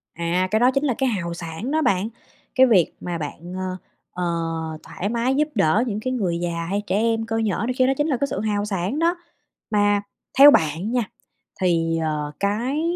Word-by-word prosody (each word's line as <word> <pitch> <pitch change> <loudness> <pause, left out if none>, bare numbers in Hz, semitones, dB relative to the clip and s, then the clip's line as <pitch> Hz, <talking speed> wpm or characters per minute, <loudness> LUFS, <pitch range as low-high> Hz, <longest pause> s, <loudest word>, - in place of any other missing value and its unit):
À, 170 +2 0
cái 215 - +3
đó 250 +2 +5
chính 275 +1 +1
là 275 -4 +2
cái 265 -1 +1
hào 180 -6 -2
sảng 170 +8 -5
đó 315 +1 +2
bạn! 195 -5 +1 0.5
Cái 260 - +7
việc 190 -9 +3
mà 175 -1 -3
bạn, 165 +3 -7
a, 185 0 -3 0.3
ờ, 180 - -4 0.6
thoải 200 - -4
mái 240 +3 0
giúp 300 +2 +2
đỡ 195 +3 +3
những 210 -2 -2
cái 255 +4 -2
người 185 -9 -1
già, 170 -1 -2
hay 200 +2 0
trẻ - - 0
em 225 +1 +1
cơ 225 0 -2
nhỡ 220 -2 0
này 255 - 0
kia 255 - +4
đó 270 - +3
chính 295 - +1
là 280 -5 +1
cái 280 - 0
sự - - -3
hào 205 -1 0
sảng 195 - -2
đó. 340 +2 +2 0.6
Mà 205 -1 +3 0.4
theo 285 +1 +11
bạn 160 - +1
nha, 245 -1 +1 0.6
thì, 165 -2 +2
ờ, 150 -2 -2
cái 235 +9 0
205 Hz, 215 wpm, -23 LUFS, 175-250 Hz, 0.6 s, theo